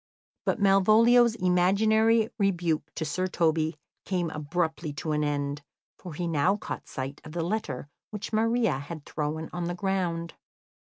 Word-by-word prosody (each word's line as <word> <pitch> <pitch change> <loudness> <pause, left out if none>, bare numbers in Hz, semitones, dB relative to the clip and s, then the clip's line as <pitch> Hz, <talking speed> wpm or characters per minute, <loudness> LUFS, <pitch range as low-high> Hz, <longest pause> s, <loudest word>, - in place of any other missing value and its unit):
But - - +1
Malvolio's 220 +4 +5
imaginary 215 +4 +3
rebuke 175 -6 0
to 160 - -2
Sir 185 +6 -1
Toby 160 -3 +1 0.3
came 175 -4 -1
abruptly 160 +1 -2
to 155 +2 -4
an 150 0 +1
end, 145 0 -2 0.4
for 175 -5 -8
he 175 - -2
now 170 +4 +2
caught - - -6
sight 135 +2 -6
of 155 - -10
the 170 -1 -1
letter 165 -8 -3 0.2
which 210 +1 -6
Maria 225 - +2
had 145 +1 -8
thrown 155 +1 -3
on 175 -1 -3
the 175 +1 -2
ground. 175 -3 -1
175 Hz, 150 wpm, -27 LUFS, 155-200 Hz, 0.4 s, Malvolio's